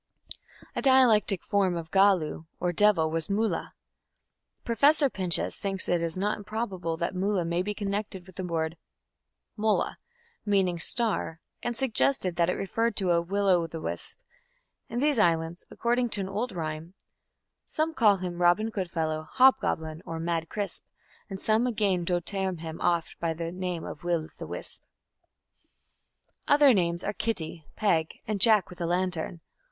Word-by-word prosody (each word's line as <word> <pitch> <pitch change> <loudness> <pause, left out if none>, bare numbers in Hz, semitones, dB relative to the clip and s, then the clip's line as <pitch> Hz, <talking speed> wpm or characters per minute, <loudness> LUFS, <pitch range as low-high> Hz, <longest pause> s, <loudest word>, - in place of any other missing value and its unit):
A - - -1
dialectic 245 -8 +4
form 190 -3 +1
of 165 -1 -7
"gallu" 190 -5 +3
or 175 0 0
devil 175 -5 +3
was 165 +1 -2
"mulla". 215 +2 -1 0.9
Professor 280 +4 +3
Pinches 180 -3 0
thinks 195 -1 -2
it 170 -1 0
not 205 +3 -1
improbable 195 -6 -3
that 170 +2 -2
"mulla" 190 -1 0
may 170 +1 0
be 205 +2 -3
connected 200 -2 -3
with 185 -2 -16
the 190 - -4
word 165 -1 -2 0.8
"mula", 215 -1 0 0.4
meaning 190 -4 +1
"star", 210 -4 0 0.2
and 240 -1 -3
suggests 265 +2 +2
that 175 -1 +1
it - - +2
referred 225 +3 -1
to 190 -4 +2
a 170 0 +3
"will 200 +4 -1
o' 175 -3 +4
the 165 0 -7
wisp". - - -5 0.7
In 235 - -4
these 290 -4 +2
islands, 165 -2 +1
according 240 +1 0
to 205 - 0
an 190 - -4
old 220 +6 -2
rhyme, 160 0 -5 0.7
Some 320 +1 -1
call 210 -9 +4
him 180 -1 -5
Robin 205 +6 +3
Good 190 -5 -3
fellow, 155 -2 -2
Hob 265 +1 +5
goblin, 160 0 -3
or 165 -1 -5
mad 165 -1 -2
Crisp, 205 -2 -4 0.5
And 195 -1 -6
some 220 +4 +2
againe 200 -7 0
doe 175 0 +1
tearme 190 -1 -3
him 160 -1 -7
oft 170 -2 0
By 165 -1 -1
name 170 +1 -4
of 150 - -8
Will 170 -3 -1
the - - -6
Wisp. - - -7 1.7
Other 290 -2 +6
names 170 -3 0
are 205 - -2
"Kitty", 170 -8 -4
"Peg", 165 -7 0
and 210 -2 -2
"Jack 215 -4 +5
with 180 - -10
a 170 - 0
lantern". 175 -1 -2
185 Hz, 160 wpm, -28 LUFS, 170-210 Hz, 1.7 s, Other